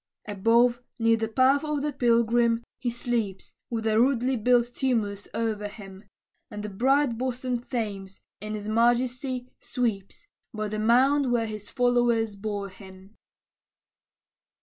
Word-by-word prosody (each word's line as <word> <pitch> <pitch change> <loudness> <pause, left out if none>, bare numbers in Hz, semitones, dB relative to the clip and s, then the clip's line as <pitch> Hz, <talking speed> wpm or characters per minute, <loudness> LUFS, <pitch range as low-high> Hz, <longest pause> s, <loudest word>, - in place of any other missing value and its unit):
Above, 235 +4 +3 0.2
near 230 0 +3
the 225 0 -2
path 260 +5 +3
of 300 -2 -2
the 295 -1 -1
pilgrim, 235 -1 +2 0.2
he 250 -1 -1
sleeps, 235 -5 -3 0.2
With 225 -2 -3
a 220 0 +3
rudely 255 +1 +2
built 240 +1 +2
tumulus 215 -7 -1
o'er 215 -2 -1
him; 195 -1 -12 0.4
And 210 0 -7
the 210 - -4
bright 255 +3 +1
bosomed 250 -1 -3
Thames, 200 -5 -4 0.2
in 215 +1 -5
his 210 0 -6
majesty, 245 +3 0
sweeps, 235 - -3 0.3
By 215 -1 -3
the 215 +1 -3
mound 255 +4 +3
where 235 -2 +1
his 215 -2 -7
followers 240 -4 +1
bore 200 -1 -4
him. 190 +2 -15
230 Hz, 135 wpm, -26 LUFS, 210-250 Hz, 0.4 s, Above